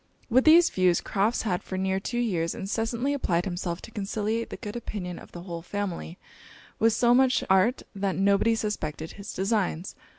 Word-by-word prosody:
With 255 +3 +4
these 330 +2 +7
views, 180 -2 +3
Crofts 210 +4 0
had 180 -5 -1
for 190 - -5
near 190 0 0
two 240 +5 -4
years 180 -9 0
incessantly 225 +7 -1
applied 175 -11 0
himself 175 -2 -3
to - - -10
conciliate 215 +2 -2
the - - -6
good 210 -2 -7
opinion 190 -7 -5
of - - -14
the 175 - -9
whole 170 -2 -6
family, 185 -2 -4 0.6
with 225 0 +4
so 240 +1 +4
much 260 0 +4
art 190 +7 +3
that 195 -1 -1
nobody 200 +3 +3
suspected 160 -8 -3
his 200 0 -8
designs. 195 -3 -1
200 Hz, 175 wpm, -27 LUFS, 180-230 Hz, 0.6 s, these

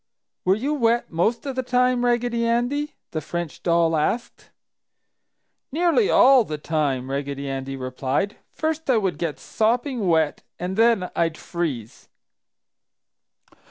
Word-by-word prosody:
"Were 185 +1 +4
you 270 +8 -1
wet 235 -4 +1
most 215 - 0
of 270 -2 -3
the 260 - 0
time, 250 0 +2
Raggedy 240 -1 +1
Andy?" 245 +6 0 0.2
the 155 - -3
French 170 +1 -5
doll 170 -1 +2
asked. 200 +10 -2 1.2
"Nearly 345 - +2
all 265 -1 +6
the 155 -7 -5
time!" 145 -4 -1
Raggedy 140 0 -3
Andy 135 0 -4
replied. 130 +8 -2
"First 315 -1 -3
I 250 - +5
would 195 -4 -1
get 165 -4 -2
sopping 240 0 0
wet 160 -3 +2 0.2
and 180 +2 -3
then 225 -4 +3
I'd 165 -1 0
freeze!" 145 - -5
195 Hz, 130 wpm, -23 LUFS, 155-245 Hz, 1.2 s, all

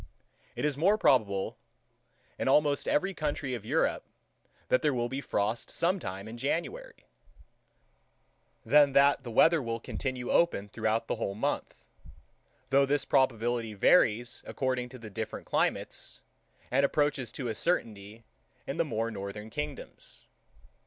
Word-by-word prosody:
It - - -2
is 145 -2 -1
more 200 +6 +4
probable, 105 - +2 0.8
in - - -1
almost 145 +1 +3
every 195 +6 +1
country 145 -5 -3
of 120 -4 -5
Europe, - - 0 0.6
that - - +3
there 150 -4 +1
will 120 0 -1
be 135 +2 -3
frost 110 -2 -1
sometime 110 - -2
in 115 +2 -8
January, 435 - -3 1.6
than 140 +3 +5
that 140 0 +5
the 120 - -7
weather 160 +7 +5
will 115 -2 -3
continue 125 +1 -4
open 105 -12 +2
throughout 110 +2 -1
that - - 0
whole 100 -3 -3
month; 105 - -3 0.9
though 140 0 +4
this 145 0 +1
probability 120 -4 +1
varies 120 - +3
according 130 -2 -2
to 130 - -10
the 110 -3 -10
different 110 +2 -5
climates, - - -2 0.5
and 135 +3 +3
approaches 140 -4 +1
to 130 - -4
a 115 - -1
certainty 110 - -2 0.4
in - - -4
the - - +3
more 115 +1 -2
northern 105 +1 -7
kingdoms. 150 +1 -7
125 Hz, 140 wpm, -29 LUFS, 110-145 Hz, 1.6 s, than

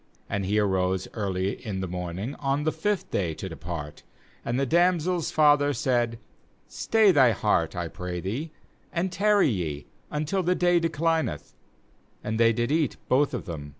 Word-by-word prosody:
8Aid 100 -1 -1
he 105 +3 +1
arose 95 -2 +1
early 95 -2 -2
in 100 -4 -4
the 95 - -3
morning 90 +7 -4
on 140 +1 0
the 155 - +1
fifth 205 +2 -2
day 85 -5 -1
to - - -6
depart; 75 -2 -7 0.4
and 120 +2 -1
the 140 - +2
dam 175 +5 +3
sel's 175 +1 -1
father 145 -2 +4
said: 120 -4 0 0.5
'Stay 220 -3 +3
thy 130 -8 +5
heart, - - +1
I - - -2
pray 90 -1 -5
thee, 120 - -4 0.4
and 180 +2 -1
tarry 205 -3 +3
ye 80 - -3 0.2
until 155 +6 -1
the 180 +1 +1
day 175 -1 +3
declineth'; 165 - -1 0.7
and 110 +1 -2
they 115 0 +5
did 120 +3 -1
eat, 155 -1 +1
both 140 +3 +3
of - - -5
them. 75 -4 -6
125 Hz, 170 wpm, -26 LUFS, -, 0.7 s, thy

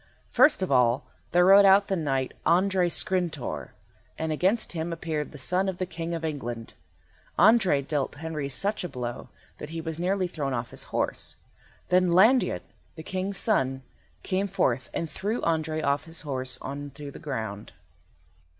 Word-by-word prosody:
First 295 -10 +5
of 185 - -2
all 125 +1 +3 0.3
there 175 0 +5
rode 195 +2 +8
out 195 +1 +6
the 195 - -1
Knight 135 -6 -1
Andrei 185 0 +3
Skrintor, 175 -6 -1 0.5
and 160 0 -2
against 190 +8 +1
him 165 0 -3
appeared 160 -3 -3
the 150 - -10
son 180 +8 +1
of 185 - -4
the 185 - -1
King 170 -1 -4
of 165 -1 -4
England. 120 -7 -5 0.6
Andrei 195 -10 +5
dealt 140 -1 -2
Henry 155 -2 -4
such 195 +11 -1
a 180 - -4
blow, 125 -3 -5 0.3
that - - -7
he 165 +1 -5
was 160 0 -5
nearly 185 +2 +1
thrown 140 -6 -3
off 120 0 -4
his - - -5
horse. - - -2 0.5
Then 180 0 +4
Landiot, 220 +9 +4 0.3
the 160 - -8
King's 190 +3 -2
son, 135 - +1 0.4
came 195 +1 0
forth 130 -10 0
and 165 - -3
threw 205 +9 -3
Andrei 155 -1 0
off 140 +1 +1
his 165 0 -3
horse 130 -3 -2
on 145 +1 -5
to 145 -1 -7
the - - -11
ground. 110 -8 -5
160 Hz, 170 wpm, -27 LUFS, 140-185 Hz, 0.6 s, rode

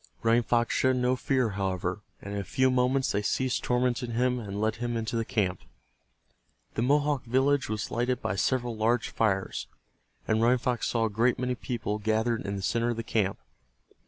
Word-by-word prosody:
Running 115 +1 +4
Fox 120 0 +1
showed 130 0 +3
no 125 0 +2
fear, 130 -2 +1
however, 95 -1 -2 0.2
and 100 - -6
in 100 - -2
a - - -3
few 130 +7 +2
moments 130 +1 +2
they 105 - 0
ceased 130 +5 0
tormenting 125 -1 0
him 125 +1 +1
and 100 -3 -5
led 110 +1 0
him 120 0 -2
into 115 +1 -3
the 115 - +1
camp. 100 -7 -1 1.1
The - - -2
Mohawk 145 +1 +2
village 135 +2 +2
was 110 -1 -3
lighted 125 +1 0
by 95 - -2
several 120 +2 0
large 115 +2 +1
fires, 95 -4 -1 0.6
and 110 +1 +2
Running 120 +2 +4
Fox 125 -1 -1
saw 115 -1 +1
a - - 0
great 120 +4 +2
many 125 0 -1
people 115 -4 -3
gathered 110 +1 0
in 100 - -2
the 95 - -5
center 115 +3 +1
of 120 - 0
the 115 - -3
camp. 105 -4 0
115 Hz, 190 wpm, -28 LUFS, 110-125 Hz, 1.1 s, Running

